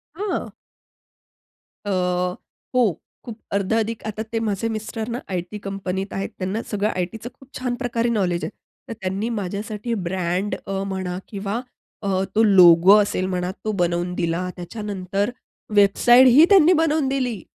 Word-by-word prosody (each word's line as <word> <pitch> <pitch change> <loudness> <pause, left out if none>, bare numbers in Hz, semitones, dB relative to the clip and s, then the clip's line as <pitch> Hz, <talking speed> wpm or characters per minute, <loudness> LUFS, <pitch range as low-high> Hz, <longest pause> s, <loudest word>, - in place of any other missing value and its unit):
हां. 405 +3 -3 1.4
अ, 205 - -2 0.8
हो. 225 -10 +2 0.3
खूप 230 -3 -7
अर्धा 200 +3 +1
अधिक 225 0 -3
आता 215 +1 -4
ते 225 0 -3
माझे 220 0 -1
मिस्टरना 220 +2 -4
आय-टी 180 +2 -4
कंपनीत 195 0 -4
आहेत 195 - -3
त्यांना 190 +4 -2
सगळं 210 0 0
आय-टीच 185 +6 -4
खूप 270 0 -19
छान 250 -1 -2
प्रकारे 240 -2 -1
नॉलेज 185 -6 0
आहे. - - -3 0.4
तर - - -3
त्यांनी 190 +4 -2
माझ्यासाठी 210 +2 -4
ब्रँड 185 +2 -1
अ, 195 0 -2
म्हणा 190 -2 -3
किंवा 205 +3 -4 0.4
अ, 195 -2 0
तो 225 - +5
लोगो 185 -2 +7
असेल 200 -3 +1
म्हणा 180 -1 -2
तो 215 - +1
बनवून 175 +1 0
दिला. 170 +2 -1
त्याच्यानंतर 200 +1 -3 0.5
वेबसाईटही 240 +7 +7
त्यांनी 365 -3 +7
बनवून 315 -3 +2
दिली. 255 -7 -1
205 Hz, 140 wpm, -22 LUFS, 185-230 Hz, 1.4 s, लोगो